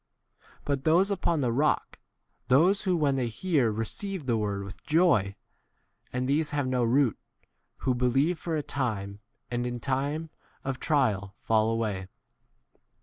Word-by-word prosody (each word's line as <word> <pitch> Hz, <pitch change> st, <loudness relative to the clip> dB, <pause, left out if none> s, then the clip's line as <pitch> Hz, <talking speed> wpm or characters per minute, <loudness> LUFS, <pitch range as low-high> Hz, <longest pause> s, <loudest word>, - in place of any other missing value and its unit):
But 140 Hz, -2 st, -1 dB
those 180 Hz, +6 st, +4 dB
upon 170 Hz, -5 st, 0 dB
the 125 Hz, -3 st, +1 dB
rock, 145 Hz, +5 st, 0 dB, 0.5 s
those 175 Hz, +11 st, +4 dB
who 185 Hz, -2 st, +2 dB
when 140 Hz, -4 st, +2 dB
they 125 Hz, -2 st, 0 dB
hear 130 Hz, 0 st, +1 dB
receive 165 Hz, -, -3 dB
the 120 Hz, -3 st, +1 dB
word 100 Hz, -2 st, -1 dB
with 100 Hz, 0 st, -10 dB
joy, 150 Hz, -, +3 dB, 0.8 s
and 125 Hz, 0 st, -1 dB
these 150 Hz, +3 st, +1 dB
have 145 Hz, -2 st, -1 dB
no 130 Hz, -1 st, +1 dB
root, 120 Hz, 0 st, +2 dB, 0.6 s
who 130 Hz, -, +1 dB
believe 135 Hz, +7 st, +1 dB
for 165 Hz, -2 st, -2 dB
a 150 Hz, -, -1 dB
time, 105 Hz, -9 st, -3 dB, 0.3 s
and 120 Hz, 0 st, -1 dB
in 120 Hz, -, -3 dB
14 -, -, -6 dB
time 140 Hz, +4 st, -1 dB, 0.3 s
of 135 Hz, -1 st, -3 dB
trial 110 Hz, -, +1 dB
fall 110 Hz, 0 st, +3 dB
away. 105 Hz, -5 st, -2 dB
130 Hz, 150 wpm, -28 LUFS, 115-155 Hz, 0.8 s, those